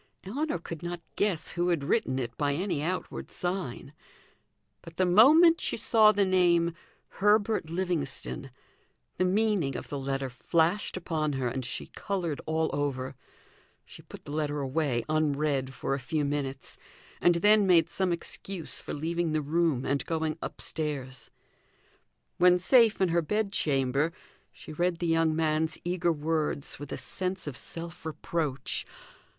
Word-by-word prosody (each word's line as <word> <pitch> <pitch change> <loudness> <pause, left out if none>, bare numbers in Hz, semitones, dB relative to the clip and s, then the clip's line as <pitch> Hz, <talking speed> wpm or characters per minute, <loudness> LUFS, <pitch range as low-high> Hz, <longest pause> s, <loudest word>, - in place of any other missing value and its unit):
Ellinor 275 - -2
could 165 -1 -8
not 175 0 -4 0.2
guess 190 -6 0
who 175 0 0
had 170 -5 +1
written 140 - +1
it 120 -3 -3
by 145 -1 0
any 175 -3 -1
outward 180 +4 -3
sign; 175 -7 -4 0.9
but 165 0 -13
the 185 - +3
moment 305 - +7
she - - 0
saw 220 -1 +6
the 205 -1 +2
name 175 -2 +3 0.5
"Herbert 205 -3 +2
Livingstone," 165 -6 -2 0.7
the 185 - +3
meaning 190 - +1
of - - -8
the 140 - -3
letter 135 0 -2
flashed 165 +10 0
upon 155 -4 -1
her 130 -2 -1
and 130 +2 -4
she 125 - -4
coloured 175 -7 -3
all 160 0 0
over. 135 -2 -2 0.7
She - - -12
put - - -13
the - - -8
letter 150 -1 -1
away, 135 -3 0
unread, 150 -3 0
for 135 +1 -3
a 135 - -1
few 145 +4 -1
minutes, 140 -2 -4 0.4
and 175 0 +5
then 205 +3 +5
made 170 -3 +5
some 180 +1 -1
excuse 170 0 -4
for - - -5
leaving 165 +2 -1
the 155 - +1
room 155 -3 +1
and 140 +1 0
going 160 -2 -1
upstairs. 130 -6 -5 1.1
When 180 0 +6
safe 225 +4 +4
in 190 - +3
her 170 +1 +2
bed 210 +5 -1
chamber, 140 -1 +1 0.4
she 155 - -11
read 175 +2 0
the 175 - -3
young 165 -1 +2
man's 155 0 0
eager 175 0 +1
words 155 -2 -1
with 145 0 -8
a - - -3
sense 185 0 -3
of 145 -4 -5
self 165 +3 -8
reproach. 155 -4 -2
160 Hz, 155 wpm, -28 LUFS, 145-180 Hz, 1.1 s, moment